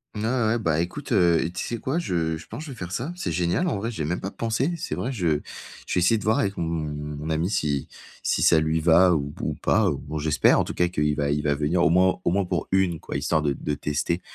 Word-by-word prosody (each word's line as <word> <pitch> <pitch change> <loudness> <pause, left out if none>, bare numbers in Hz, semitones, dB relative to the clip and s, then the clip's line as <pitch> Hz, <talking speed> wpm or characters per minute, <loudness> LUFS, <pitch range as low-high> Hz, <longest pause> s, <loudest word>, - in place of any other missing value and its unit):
Ouais, 105 - -3
ouais, 110 - +1 0.2
ouais, 115 +2 +2
bah 80 -8 0
écoute, 105 - -4
heu, 85 -5 +3
tu - - -3
sais 120 - -3
quoi? 135 +9 -1
Je 80 - -1
je 80 - -13
pense - - -7
que - - -9
je - - -7
vais 125 - -9
faire 90 -3 -6
ça, 125 - -3
c'est 180 - -3
génial 85 - 0
en 165 - 0
vrai, 115 +4 -3
j'ai 95 -9 -4
même 85 +4 -2
pas 95 - -4
pensé, 115 +7 -1
c'est 165 - -4
vrai, 130 - -3
je 85 - 0 0.4
je - - -4
vais - - +2
essayer 90 +6 +4
de 105 - -6
voir 110 +2 +2
avec 100 0 -1
mon 85 - -1
mon 75 -2 -4
ami 80 +4 0
si 75 -8 -1 0.4
si - - +1
ça 80 - +5
lui 80 +1 +1
va 85 +3 +5
ou 70 -3 -1
p - - -17
ou - - -1
pas. - - +2
Bon 75 +2 -5
j'espère 75 0 +3
en - - +3
tout - - -5
cas 90 - +2
qu'il 75 -4 0
va 70 -1 0
il 75 +1 0
va 75 - +2
venir 75 +5 +1
au - - +5
moins 90 +1 +3
au - - +1
moins 100 +1 +1
pour - - -2
1 95 -4 +2
quoi, - - -7
histoire 75 +2 +1
de 70 -2 +1
de 75 +2 -3
tester. 75 +5 -1
85 Hz, 280 wpm, -25 LUFS, 75-100 Hz, 0.4 s, ça